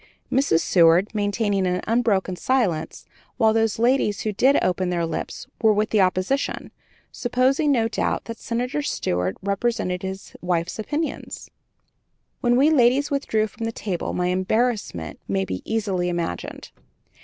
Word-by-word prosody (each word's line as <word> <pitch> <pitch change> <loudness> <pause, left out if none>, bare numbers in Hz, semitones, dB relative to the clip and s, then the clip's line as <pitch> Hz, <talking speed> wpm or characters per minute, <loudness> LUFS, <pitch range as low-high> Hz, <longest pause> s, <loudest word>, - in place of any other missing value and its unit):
Mrs. 255 - +3
Seward 175 +4 +4
maintained 205 -2 0
an 180 0 0
unbroken 215 -5 +1
silence, 190 -9 -1 0.3
while 220 -3 +4
those 225 -1 +1
ladies 235 -3 +2
who 215 - -2
did 265 +8 +4
open 185 0 0
their 170 -1 0
lips 165 - -5 0.2
were 220 -1 +5
with 210 +1 0
the 215 - +4
opposition, 185 +9 0 0.4
supposing, 260 +5 +1
no 230 -4 +2
doubt, 225 - -2
that 230 -1 -7
Senator 250 +5 -2
Seward 90 - -1
represented 200 -2 -1
his 190 +1 -7
wife's 175 +2 -1
opinions. 300 +8 -4 0.9
When 240 0 +2
we 280 +5 +4
ladies 270 0 +3
withdrew 225 -6 +1
from 225 +1 -6
the 225 - -1
table 195 -6 -3
my 180 0 0
embarrassment 185 - -1
may 95 -1 0
be 95 -1 -4
easily 195 -5 0
imagined. 175 -1 -4
210 Hz, 145 wpm, -23 LUFS, 180-240 Hz, 0.9 s, were